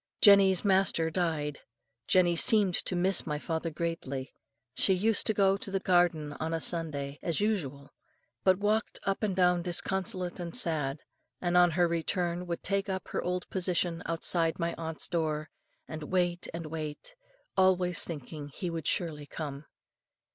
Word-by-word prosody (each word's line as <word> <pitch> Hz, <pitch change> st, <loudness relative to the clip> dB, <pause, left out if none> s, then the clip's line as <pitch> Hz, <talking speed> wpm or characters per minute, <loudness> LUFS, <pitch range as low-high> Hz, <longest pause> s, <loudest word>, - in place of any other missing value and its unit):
Jenny's 200 Hz, -2 st, +6 dB
master 190 Hz, -4 st, +3 dB
died. 160 Hz, -4 st, -1 dB, 0.5 s
"Jenny 175 Hz, -2 st, +4 dB
seemed 200 Hz, +1 st, +4 dB
to 185 Hz, -, -2 dB
miss 185 Hz, +2 st, +2 dB
my 150 Hz, -1 st, -1 dB
father 160 Hz, +2 st, -3 dB
greatly. 150 Hz, -5 st, -4 dB, 0.4 s
She 190 Hz, +7 st, +2 dB
used 215 Hz, +4 st, +2 dB
to 220 Hz, -, +3 dB
go 195 Hz, -1 st, +3 dB
to 200 Hz, -, -7 dB
the 195 Hz, 0 st, -1 dB
garden 175 Hz, -6 st, +2 dB
on 160 Hz, +1 st, -1 dB
a -, -, -1 dB
Sunday, 145 Hz, -5 st, -2 dB
as 170 Hz, -3 st, 0 dB
usual, 150 Hz, -10 st, -2 dB, 0.5 s
but 185 Hz, -1 st, +4 dB
walked 210 Hz, +3 st, 0 dB
up 195 Hz, 0 st, -1 dB
and 205 Hz, -4 st, 0 dB
down 180 Hz, -1 st, +3 dB
disconsolate 180 Hz, +1 st, -1 dB
and 170 Hz, -1 st, -4 dB
sad; 150 Hz, -4 st, -1 dB, 0.4 s
and 175 Hz, -1 st, -1 dB
on 180 Hz, 0 st, +6 dB
her 175 Hz, -1 st, +4 dB
return 175 Hz, +1 st, -1 dB
would 170 Hz, -1 st, -4 dB
take 200 Hz, +1 st, -1 dB
up 190 Hz, -1 st, -4 dB
her -, -, -2 dB
old 180 Hz, 0 st, -2 dB
position 175 Hz, -2 st, 0 dB
outside 165 Hz, 0 st, 0 dB
my 170 Hz, 0 st, -1 dB
aunt's 160 Hz, -1 st, -4 dB
door, 155 Hz, -3 st, -2 dB, 0.4 s
and 155 Hz, -1 st, -6 dB
wait 175 Hz, -1 st, 0 dB
and 165 Hz, 0 st, -6 dB
wait, 155 Hz, -, -6 dB, 0.4 s
always 185 Hz, -2 st, +3 dB
thinking 150 Hz, -1 st, -6 dB
he 175 Hz, +5 st, -5 dB
would 165 Hz, -2 st, -4 dB
surely 150 Hz, -4 st, -1 dB
come. 145 Hz, -1 st, -6 dB
175 Hz, 160 wpm, -30 LUFS, 160-185 Hz, 0.5 s, Jenny's